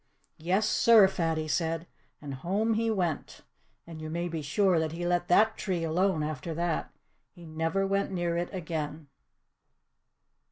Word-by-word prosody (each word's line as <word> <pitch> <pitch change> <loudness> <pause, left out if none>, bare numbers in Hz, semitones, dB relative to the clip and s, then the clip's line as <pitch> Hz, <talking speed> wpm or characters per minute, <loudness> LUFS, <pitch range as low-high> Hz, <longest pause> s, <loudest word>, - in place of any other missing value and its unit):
"Yes, 190 +7 +1
sir!" 215 -1 +6
Fatty 165 -4 -1
said. 165 +2 -1 0.4
And 140 -1 -5
home 195 +11 0
he 225 +1 0
went. 180 -8 -2 0.4
And 165 -2 -9
you 155 - -5
may 170 +2 -2
be 165 -1 -4
sure 180 +4 +2
that 160 0 -2
he 175 +1 -4
let 175 0 0
THAT 220 +5 +4
tree 180 -4 -2
alone 165 0 +1
after 155 +2 -4
that. 170 -1 -1 0.5
He 175 -2 -13
never 165 +4 -1
went 195 +1 0
near 175 -2 -1
it 175 +1 -2
again. 155 -4 -5
170 Hz, 155 wpm, -29 LUFS, 160-190 Hz, 0.5 s, sir